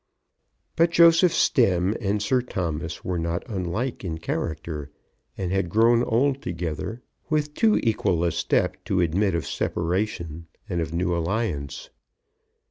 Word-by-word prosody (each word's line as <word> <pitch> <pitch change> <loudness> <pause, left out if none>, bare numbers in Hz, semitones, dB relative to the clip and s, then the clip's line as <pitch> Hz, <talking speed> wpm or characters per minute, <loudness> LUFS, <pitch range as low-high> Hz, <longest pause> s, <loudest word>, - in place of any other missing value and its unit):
But 170 +1 +4
Joseph 170 +1 +6
Stemm 95 - +3
and 100 0 0
Sir 125 +5 +2
Thomas 85 -8 -4
were 90 -2 -1
not 85 +1 -2
unlike 105 +4 -3
in 80 -4 -3
character, 80 -2 -4 0.5
and 90 -2 -2
had 95 -2 0
grown 115 +4 +4
old 135 +4 +1
together 90 +7 -4 0.3
with 150 -1 0
too 220 +5 +3
equal 95 -7 +1
a 85 - +2
step - - 0
to 95 - 0
admit 90 +3 +1
of 85 - -2
separation 85 -2 -2 0.2
and 90 -5 -1
of 80 -2 -3
new 85 +1 0
alliance. 85 -6 -2
90 Hz, 135 wpm, -25 LUFS, 85-115 Hz, 0.5 s, Joseph